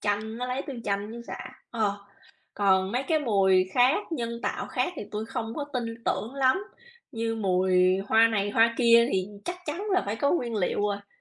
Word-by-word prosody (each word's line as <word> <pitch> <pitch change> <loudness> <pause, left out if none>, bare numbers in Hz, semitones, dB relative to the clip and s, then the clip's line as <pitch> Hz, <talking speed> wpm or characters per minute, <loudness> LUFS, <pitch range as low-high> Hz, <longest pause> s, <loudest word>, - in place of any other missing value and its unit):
chanh, 215 +2 -2
nó 250 - -2
lấy 255 +2 -2
từ 275 - -5
chanh 200 +1 -2
với 235 +1 -8
sả, - - -5 0.4
ờ. 215 -4 0 0.6
Còn 190 -1 +2
mấy 250 +2 0
cái 315 +1 +1
mùi 195 -7 +3
khác 265 +9 +3
nhân 235 -4 -3
tạo - - -2
khác 360 - -1
thì - - -4
tui 215 +1 -3
không 225 -1 -4
có 290 - -3
tin 250 -3 -1 0.2
tưởng 235 +5 -2
lắm, 275 +9 +2 0.5
như 225 0 -2
mùi 185 -2 +2
hoa 225 +1 +6
này 205 -2 0
hoa 230 +2 +4
kia 235 -1 +6
thì 185 -1 0 0.2
chắc 355 0 -4
chắn 320 +6 -3
là 370 -1 +3
phải 205 - -2
có 280 +4 +1
nguyên 245 -9 -1
liệu 195 +1 0
rồi. 205 -1 -2
225 Hz, 205 wpm, -27 LUFS, 200-250 Hz, 0.6 s, hoa